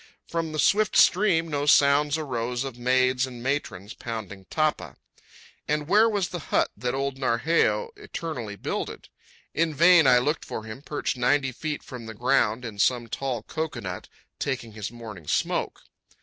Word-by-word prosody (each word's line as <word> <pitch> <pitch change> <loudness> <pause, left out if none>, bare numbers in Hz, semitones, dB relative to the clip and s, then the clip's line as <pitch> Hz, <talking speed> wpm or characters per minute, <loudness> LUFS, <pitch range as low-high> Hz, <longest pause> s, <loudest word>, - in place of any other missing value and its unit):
From 165 -1 -2
the 155 - -5
swift 210 +9 +3
stream 180 -4 +4
no 145 -2 -2
sounds 145 +1 +5
arose 125 -4 -2
of 135 -3 -6
maids 130 +1 +2
and 120 -2 -9
matrons 115 -7 -3
pounding 100 -5 -7
tapa. 155 -1 -1 0.7
And 150 0 -1
where 215 +5 +5
was 200 -5 -1
the 175 - -5
hut - - +2
that 125 +5 -2
old 135 0 -2
Narheyo 160 - +1
eternally 160 - -6
builded? - - -5 0.4
In 160 -1 0
vain 170 -1 +6
I 125 -1 +7
looked 150 +6 0
for 110 - -6
him 110 +4 -8
perched 145 -3 -3
ninety 135 +2 +2
feet 150 +4 -4
from 125 -4 -9
the 110 - -8
ground 120 -1 +1
in 105 -3 -7
some 120 +1 +2
tall 125 -2 -3
cocoanut, 120 - -5 0.3
taking 125 -4 -3
his 105 -1 -5
morning 110 -9 -10
smoke. - - -1
135 Hz, 160 wpm, -26 LUFS, 115-155 Hz, 0.7 s, I